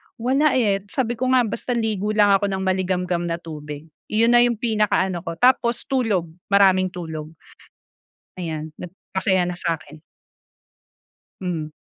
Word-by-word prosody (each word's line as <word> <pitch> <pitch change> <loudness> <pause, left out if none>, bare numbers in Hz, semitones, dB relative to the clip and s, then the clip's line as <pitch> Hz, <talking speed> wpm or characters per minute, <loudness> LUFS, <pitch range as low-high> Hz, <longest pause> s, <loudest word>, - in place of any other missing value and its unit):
wala, 270 +5 +2
eh, 210 -6 +2
sabi 240 +1 -1
ko 255 - 0
nga, 250 - +5
basta 235 +3 -3
ligo 215 -3 -1
lang 205 -1 +5
ako 200 +1 +3
nang 190 -1 -2
maligamgam 180 -2 0
na 165 - -1
tubig, 150 -1 -8 0.2
'yun 230 +2 +3
na 240 - +6
'yung 240 -1 +1
pinakaano 210 -5 +1
ko, - - -3
tapos 240 +3 +2
tulog 220 - 0 0.2
maraming 190 -2 +4
tulog. 160 -3 -6 1.1
Ayan, 155 -2 -5
nag 180 - -6 0.2
masaya 190 -1 +2
nasa 175 -1 -2
akin. 155 0 -15 1.4
Mm. 165 -4 -3
190 Hz, 140 wpm, -22 LUFS, 170-225 Hz, 1.4 s, na